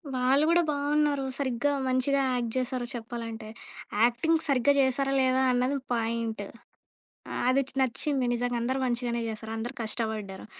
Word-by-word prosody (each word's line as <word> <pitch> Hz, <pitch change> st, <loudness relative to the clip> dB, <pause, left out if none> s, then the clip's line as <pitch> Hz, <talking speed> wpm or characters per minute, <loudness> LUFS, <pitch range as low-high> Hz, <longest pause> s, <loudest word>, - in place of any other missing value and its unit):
వాళ్ళు 265 Hz, +4 st, +3 dB
గూడా 345 Hz, +1 st, +5 dB
బావున్నారు. 290 Hz, -1 st, +1 dB
సరిగ్గా 275 Hz, +1 st, 0 dB, 0.2 s
మంచిగా 260 Hz, +2 st, +2 dB
యాక్ట్ 240 Hz, -2 st, -1 dB
జేశారు 255 Hz, -1 st, -1 dB
చెప్పాలంటే. 230 Hz, -1 st, -6 dB, 0.6 s
యాక్టింగ్ 290 Hz, +8 st, +3 dB
సరిగ్గా 275 Hz, 0 st, +4 dB
జేశారా 270 Hz, +1 st, +2 dB
లేదా 260 Hz, 0 st, +3 dB
అన్నది 255 Hz, +3 st, +1 dB, 0.2 s
పాయింటు. 225 Hz, -2 st, -2 dB, 0.8 s
ఆహ్, -, -, -2 dB
అది 270 Hz, +2 st, +4 dB, 0.2 s
నచ్చింది 260 Hz, +1 st, 0 dB
నిజంగా 245 Hz, 0 st, -1 dB
అందరు 260 Hz, +3 st, -1 dB
మంచిగానే 240 Hz, -1 st, -1 dB
చేశారు. 220 Hz, 0 st, -6 dB
అందరు 240 Hz, +4 st, -4 dB
కష్టబడ్డారు. 215 Hz, -3 st, -3 dB
250 Hz, 130 wpm, -28 LUFS, 230-275 Hz, 0.8 s, గూడా